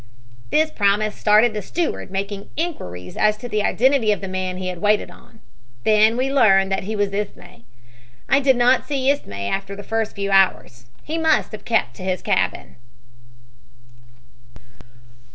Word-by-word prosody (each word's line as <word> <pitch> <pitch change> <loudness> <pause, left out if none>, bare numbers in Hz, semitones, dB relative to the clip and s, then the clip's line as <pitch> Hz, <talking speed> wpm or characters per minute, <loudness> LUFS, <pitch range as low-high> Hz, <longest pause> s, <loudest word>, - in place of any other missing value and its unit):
"This 310 0 +2
promise 210 -1 +1
started 215 +3 +3
the 210 - -3
steward 330 - -3
making 200 +1 -5
inquiries 90 - -5
as 215 0 +2
to 245 - -7
the 215 -2 -1
identity 245 0 +2
of 205 - 0
the 195 - -6
man 185 -1 -3
he 185 0 -4
had 180 -2 -5
waited 210 0 +1
on. - - -19 0.4
Then 215 +2 +4
we 265 +2 -1
learned 195 -7 +4
that 195 -1 -1
he 215 +2 -3
was 205 -1 -1
Ismay. 200 - -6 0.6
I 275 - +4
did 270 -2 +3
not 245 +1 +3
see 275 -2 +1
Ismay 100 - -4
after 195 - -3
the 205 - -9
first 225 +1 -2
few 200 -1 -3
hours. 180 -11 +1 0.2
He 320 +2 -3
must 320 -1 +2
have 215 -2 -9
kept 220 - 0
to - - -9
his 185 -1 -2
cabin." - - -1
210 Hz, 165 wpm, -21 LUFS, 195-245 Hz, 0.6 s, Then